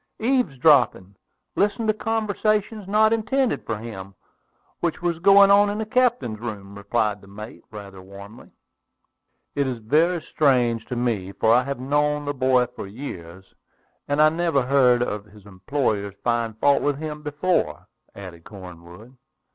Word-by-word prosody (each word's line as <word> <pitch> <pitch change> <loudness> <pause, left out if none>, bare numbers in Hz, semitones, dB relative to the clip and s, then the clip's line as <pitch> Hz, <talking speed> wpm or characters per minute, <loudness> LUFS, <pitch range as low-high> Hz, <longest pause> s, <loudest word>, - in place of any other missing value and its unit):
"Eavesdropping; 145 - +2 0.4
listening 210 +3 0
to 215 - +3
conversation 215 -1 -1
not 215 +2 +3
intended 235 +4 0
for 110 - -2
him, 100 -4 -9 0.6
which 170 -2 -2
was 175 -2 -2
going 200 +2 +6
on 205 +1 +5
in 205 - -3
the 220 - -3
captain's 235 - 0
room," 105 -4 -7
replied 105 0 -2
the 100 - -17
mate, 105 +3 -10
rather 100 -3 -10
warmly. 100 +3 -13 1.0
"It 140 -1 0
is 125 -2 -3
very 155 +10 +1
strange 125 -8 +1
to 125 - -4
me, 115 -6 -2
for 110 +2 +2
I 125 +2 +4
have 140 -2 -4
known 145 +2 0
the 145 - -2
boy 130 -2 +2
for 125 -4 -9
years, 95 -6 -10 0.5
and 145 +1 -1
I 155 0 +6
never 160 -4 0
heard 125 -2 +3
any - - -2
of 105 0 -6
his 105 -1 -18
employers 100 0 -3
find 115 -2 -1
fault 140 +2 +3
with 145 -1 0
him 150 0 -6
before," 150 +5 -2 0.3
added 90 -4 -10
Cornwood. 90 +4 -13
125 Hz, 155 wpm, -23 LUFS, 105-170 Hz, 1.0 s, going